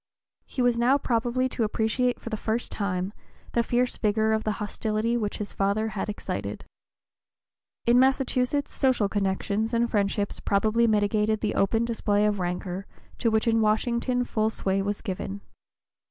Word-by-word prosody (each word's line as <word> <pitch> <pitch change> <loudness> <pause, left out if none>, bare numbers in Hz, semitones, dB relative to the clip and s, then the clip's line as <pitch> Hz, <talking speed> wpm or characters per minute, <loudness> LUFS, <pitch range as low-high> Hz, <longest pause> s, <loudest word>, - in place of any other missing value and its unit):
He 255 - -2
was 240 -1 +2
now 255 +4 +4
probably 245 0 0
to 235 - -1
appreciate 225 +3 0
for 230 - -8
the - - 0
first 220 +2 -2
time 190 -1 -2 0.4
the 235 - +2
fierce 245 +1 0
vigor 220 0 +2
of 220 0 0
the 215 - 0
hostility 215 +2 -1
which 210 -3 -1
his 210 - -5
father 200 +3 0
had 210 0 -4
excited. 205 - -4 1.2
In 240 +1 +5
Massachusetts 265 +1 +1
social 255 -6 +2
connections 205 +3 -1
and 235 0 +1
friendships 200 0 0
probably 220 +4 +2
mitigated 210 0 +2
the 215 - 0
open 225 +4 +2
display 210 -3 +1
of 210 -1 +1
rancor 180 +2 -3 0.3
to 230 - +2
which 220 +1 +1
in 225 -1 +3
Washington 235 +3 +1
full 220 -2 0
sway 195 -3 -1
was 200 +1 -2
given. 195 -1 -4
220 Hz, 155 wpm, -26 LUFS, 205-235 Hz, 1.2 s, In